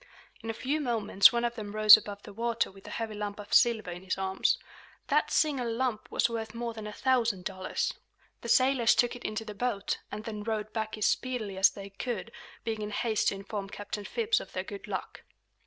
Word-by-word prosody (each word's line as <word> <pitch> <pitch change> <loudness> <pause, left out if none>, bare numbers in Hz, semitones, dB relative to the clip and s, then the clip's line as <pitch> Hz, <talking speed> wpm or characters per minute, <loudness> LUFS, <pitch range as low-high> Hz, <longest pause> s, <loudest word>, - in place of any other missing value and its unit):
In 225 - -6
a - - -1
few 285 +7 -1
moments 225 -6 +5
one 235 0 0
of 235 - -1
them 210 -2 -7
rose 215 -1 +10
above 205 -1 -5
the - - -10
water 230 +1 -1
with 195 0 -15
a - - -7
heavy 225 -2 -4
lump 210 0 -5
of 205 - -8
silver 225 -6 +4
in 175 +1 -7
his 190 0 -2
arms. 190 0 +1 0.5
That - - +3
single 270 -6 +1
lump 235 -2 -2
was - - +2
worth 230 -1 -5
more 235 0 -3
than 220 -1 -7
a - - -5
thousand 230 -6 +1
dollars. 185 -1 -2 0.5
The 235 - -6
sailors 255 -1 +4
took 245 0 +2
it 245 - -10
into 215 +1 -3
the 210 - -6
boat, 205 -1 -2
and 210 +1 -5
then 215 -2 -5
rowed 215 0 -3
back 220 -1 -3
is 215 - 0
speedily 230 -5 -1
as 190 +1 +6
they 200 0 -10
could, 230 +1 -4 0.3
being 220 -1 -3
in 210 - -3
haste 215 +1 0
to - - +2
inform 195 0 -5
Captain 205 +1 -6
Phips 445 - +1
of - - -10
their - - -2
good 400 0 -8
luck. - - -5
220 Hz, 220 wpm, -29 LUFS, 205-235 Hz, 0.5 s, rose